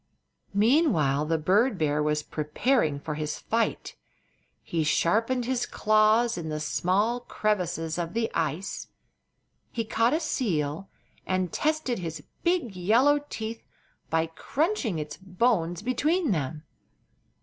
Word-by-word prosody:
Meanwhile 200 - +3
the 165 0 +2
bird 200 +9 +2
bear 150 -2 +1
was 150 0 0
preparing 150 - 0
for 150 +1 -4
his 150 0 -3
fight. 230 0 -1 0.7
He 165 -2 -1
sharpened 225 +11 +1
his 250 -1 -1
claws 215 +1 +3
in 160 -2 -5
the 155 0 -3
small 185 +10 +1
crevasses 180 -8 -1
of 170 +2 -4
the 230 -1 0
ice. 165 +3 -2 0.8
He 230 -2 -2
caught 230 +3 +2
a - - +1
seal 185 - -1 0.4
and 185 -2 0
tested 305 -7 0
his 160 -4 -5 0.2
big 340 - 0
yellow 235 +11 +4
teeth 225 +1 -5 0.5
by 160 0 +2
crunching 255 - -1
its 150 -1 -5
bones 185 -2 0
between 295 - +1
them. 155 -2 -2
195 Hz, 125 wpm, -27 LUFS, 160-240 Hz, 0.8 s, yellow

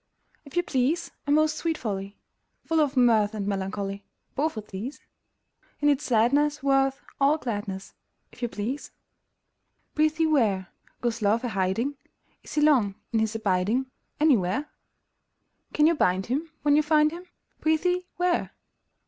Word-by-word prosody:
If 280 +4 -9
you 350 - +3
please, 295 +5 0 0.2
A - - +1
most 310 +1 +3
sweet 325 -2 -1
folly! 200 -2 -4 0.5
Full 325 -1 +1
of 285 -3 0
mirth 220 -4 +4
and 205 -2 -3
melancholy: 195 0 -3 0.3
Both 300 -2 -1
of 215 - -5
these! 220 +9 -6 0.8
In 295 - +3
its 290 0 +2
sadness 280 +5 +2
worth 270 -1 +2 0.2
all 285 +3 +4
gladness, 205 -7 -5 0.4
If - - -17
you 240 - 0
please! 235 +8 -4 1.0
Prithee 310 +1 +2
where, 215 - +2 0.3
Goes 235 -2 -1
Love 215 +4 +2
a 245 - -1
hiding? 225 +8 -1 0.4
Is - - -10
he 300 - +2
long 250 -10 +4 0.2
in 225 - +3
his 220 0 0
abiding 220 +5 0 0.3
Anywhere? 275 - +2 1.0
Can 300 - +3
you 330 - +5
bind 190 - +1
him 300 +7 -2
when 290 0 +4
you 305 - +5
find 305 0 +3
him; 350 +2 -8 0.3
Prithee, 360 +3 +1
where? 355 0 0
265 Hz, 150 wpm, -26 LUFS, 210-305 Hz, 1.0 s, you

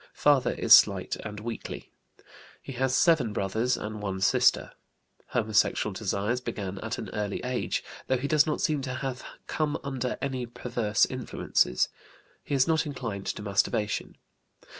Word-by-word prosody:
Father 140 -4 +3
is - - +5
slight - - +3
and 105 -1 -7
weakly. 115 +1 -6 0.7
He - - -9
has 130 +1 +1
seven 150 -11 +3
brothers 110 +6 0
and 105 0 -6
one 95 -2 -3
sister. 95 - +3 0.6
Homosexual 110 -3 +1
desires 110 +6 -1
began 100 -5 -5
at 110 +2 -4
an - - -6
early 105 -2 -2
age, 125 0 -2 0.2
though 130 - +2
he 135 +3 -3
does 150 0 +4
not 150 - -1
seem 150 -2 +1
to 130 -1 -4
have 130 -1 -4 0.2
come 150 -1 -1
under 130 -2 -3
any 130 -3 -3
perverse 115 -3 0
influences. 65 - 0 0.6
He 145 - -2
is 130 -1 +3
not 160 -1 +2
inclined 115 -8 -5
to 105 - -3
masturbation. 105 +1 -1
120 Hz, 150 wpm, -28 LUFS, 105-135 Hz, 0.7 s, is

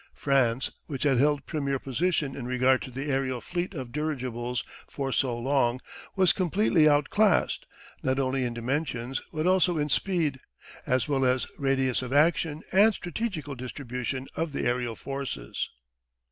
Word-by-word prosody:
France, 135 -3 +1 0.2
which 140 -4 -3
had 135 -4 +3
held 145 +1 +2
premier 140 -4 -1
position 140 +1 -1
in 125 -3 -5
regard 130 +1 +3
to - - -6
the 135 +3 -5
aerial 130 -2 0
fleet 175 +6 -4
of 130 -5 -5
dirigibles 125 -4 -2 0.3
for 135 -1 -3
so 125 -1 +1
long, 125 -1 +1 0.4
was 190 -2 +5
completely 180 -3 +3
out 145 0 +2
classed, 210 -3 +2 0.3
not 130 0 0
only 130 -1 +1
in 120 - -1
dimensions 125 0 -2
but 155 0 -2
also 180 -2 +3
in 150 0 0
speed, 160 -5 +1 0.5
as 130 +2 +2
well 135 -2 +1
as 130 0 +2
radius 135 -2 +1
of 125 -1 -5
action 155 +1 +2
and 205 +3 +5
strategical 175 -6 -4
distribution 130 0 -4
of 165 -2 -2
the - - -2
aerial 120 -1 0
forces. 135 - -4
135 Hz, 155 wpm, -28 LUFS, 125-155 Hz, 0.5 s, was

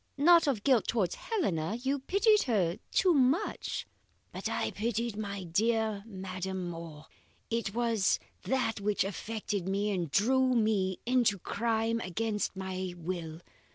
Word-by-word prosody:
Not 335 +3 +6
of 235 -8 0
guilt 255 -5 +3
towards 200 -7 +1
Helena; 210 - -1
you 270 +3 0
pitied 405 - +3
her 185 -7 +1
too 370 -2 +4
much 280 +7 +1 0.2
" - - -40
"But - - -3
I - - -1
pitied 230 +1 -2
my 200 -2 -4
dear 215 +3 0
madam 185 -2 -4
more. 165 -2 -9 0.5
It 225 -3 -1
was 230 -5 +2 0.2
that 250 -5 -1
which 210 0 +1
affected 205 0 -3
me 200 +2 0
and 175 -5 -1
drew 255 - +3
me 205 -5 +1
into 240 -4 +3
crime 225 +3 0
against 210 +1 -2
my 185 -1 -4
will. 165 -1 -5
210 Hz, 140 wpm, -31 LUFS, 185-240 Hz, 0.5 s, Not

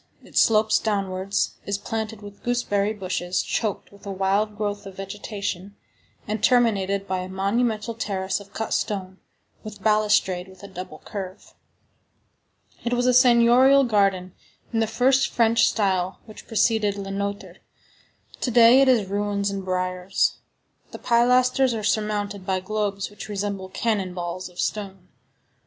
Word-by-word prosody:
It - - -17
slopes 215 -1 +4
downwards, 195 -2 -1
is 200 0 -1
planted 220 0 -5
with 205 0 -11
gooseberry 215 -4 0
bushes, 185 -3 -2
choked 215 -4 -3
with 200 -1 -18
a - - -3
wild 200 +2 0
growth 205 -1 -3
of 195 - -10
vegetation, 200 -1 -5 0.5
and 215 +1 -3
terminated 200 -5 +2
by 185 0 -1
a 185 0 -6
monumental 215 +4 -1
terrace 190 -4 -2
of 200 0 -14
cut 220 +1 -3
stone, 190 -3 -3 0.4
with 210 -2 -10
balustrade 210 -4 +2
with 190 0 -16
a - - -7
double 185 -4 -9
curve. 195 -1 -7 1.3
It 240 - -1
was 245 0 +1
a 250 - +4
seignorial 250 +2 +6
garden 195 -6 +1 0.4
in 225 - +1
the 225 - +1
first 260 +4 +3
French 230 -1 +3
style 190 -3 0
which 215 -2 -13
preceded 215 -2 +1
Le 195 -1 -5
Nôtre; 200 +1 -4 0.8
to - - -1
day 240 +2 +7
it 270 - +4
is 235 -7 +3
ruins 200 0 -1
and 195 -1 -4
briars. 185 0 -1 0.5
The - - -8
pilasters 250 +1 +3
are 215 - -4
surmounted 205 -2 -1
by 190 -1 -1
globes 200 0 -3
which 205 - -10
resemble 200 -2 -3
cannon 195 -4 -1
balls 175 +1 -5
of 180 - -16
stone. 195 -3 -4
205 Hz, 145 wpm, -24 LUFS, 190-225 Hz, 1.3 s, day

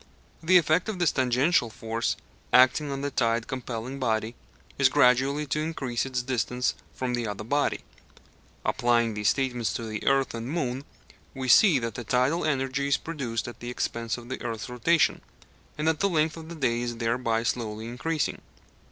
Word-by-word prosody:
The 180 +3 +6
effect 165 +3 +2
of 215 - -3
this 175 -3 +2
tangential 130 +1 +2
force 115 +1 -2 0.4
acting 130 +4 +5
on 135 0 -3
the 145 0 -2
tide 115 -2 +1
compelling 130 0 -5
body 110 -2 0 0.5
is 135 -1 +6
gradually 135 +2 +3
to 145 +2 -1
increase 135 -6 -2
its 125 -2 -2
distance 125 0 0 0.2
from 125 -1 -3
the 120 -2 -1
other 105 0 -5
body. 145 +6 0 0.8
Applying 120 -2 +2
these 105 0 +1
statements 125 -4 0
to 115 - -4
the 110 -1 -5
earth 135 -1 +3
and 115 +1 -5
moon, 135 -4 -2 0.5
we 130 -1 -4
see 165 - +7
that 115 -1 -4
tidal 130 +7 +2
energy 140 -1 0
is 140 - +3
produced 130 -8 -4
at 120 - -9
the 120 - -6
expense 115 -1 -2
of 120 -1 -11
the 130 - -5
earth's 115 -2 -4
rotation, 150 +7 +2 0.6
and 150 +1 -1
that 160 -2 +2
the 200 - +2
length 155 -2 +1
of 160 -1 -9
the 170 - -7
day 120 -5 0
is 120 -1 -3
thereby 115 -1 0
slowly 110 -2 -2
increasing. 150 +7 -2
125 Hz, 175 wpm, -27 LUFS, 115-145 Hz, 0.8 s, see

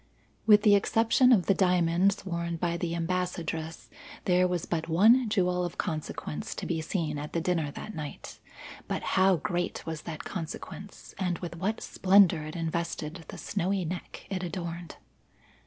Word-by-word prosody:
With 210 -1 +7
the 210 - +6
exception 225 +5 +4
of 200 -8 +5
the 195 - +4
diamonds 180 +1 +2
worn 170 -2 -2
by 170 +1 -1
the 170 -1 -2
Ambassadress, 170 -2 -3 0.4
there 180 0 +4
was 180 -2 -2
but 165 -1 -2
one 220 +8 +5
jewel 180 -3 +1
of 175 - -4
consequence 155 -1 -4
to - - -5
be 165 -2 -1
seen 155 -3 -2
at 150 +1 -7
the 170 - +1
dinner 165 -3 0
that 215 +9 -8
night; 150 -3 -7 0.5
but - - -3
how 190 0 +5
great 175 +2 -2
was 160 -2 -4
that 160 -3 -6
consequence 190 +3 -7
and 180 -3 0
with 170 0 -6
what 195 +6 -2
splendour 190 -4 +4
it 155 - -7
invested 165 0 -3
the - - -8
snowy 190 +1 -1
neck 175 +2 -6
it 185 -2 -2
adorned! 170 -2 -5
175 Hz, 160 wpm, -29 LUFS, 165-190 Hz, 0.5 s, With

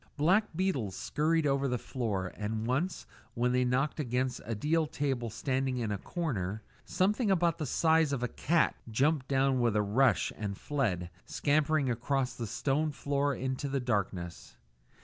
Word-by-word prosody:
Black 185 +9 +4
beetles 140 - -1
scurried 160 +1 +1
over 140 -1 +2
the 125 -1 0
floor, 105 -8 -3
and 110 +1 -3
once, 155 +8 -1 0.3
when 125 +1 +1
they 125 0 +3
knocked 130 +5 0
against 125 -2 -1
a 115 +1 -2
deal 155 +7 +1
table 130 -4 -2
standing 130 +3 -1
in 115 -3 -1
a 100 - -2
corner, 110 - -3 0.2
something 205 +5 +1
about 170 -3 +2
the 155 - -2
size 160 +1 +3
of 130 -3 -1
a - - +1
cat 165 +6 +1 0.2
jumped 135 +4 +1
down 135 -1 +2
with 120 -3 +2
a 105 - +3
rush 110 +1 +2
and 100 -2 -4
fled, 95 -12 -1 0.2
scampering 150 0 +2
across 125 +2 0
the 115 - -5
stone 140 +7 0
floor 140 0 0
into 130 +2 -3
the 135 0 0
darkness. 100 -8 -3
130 Hz, 165 wpm, -31 LUFS, 115-150 Hz, 0.3 s, Black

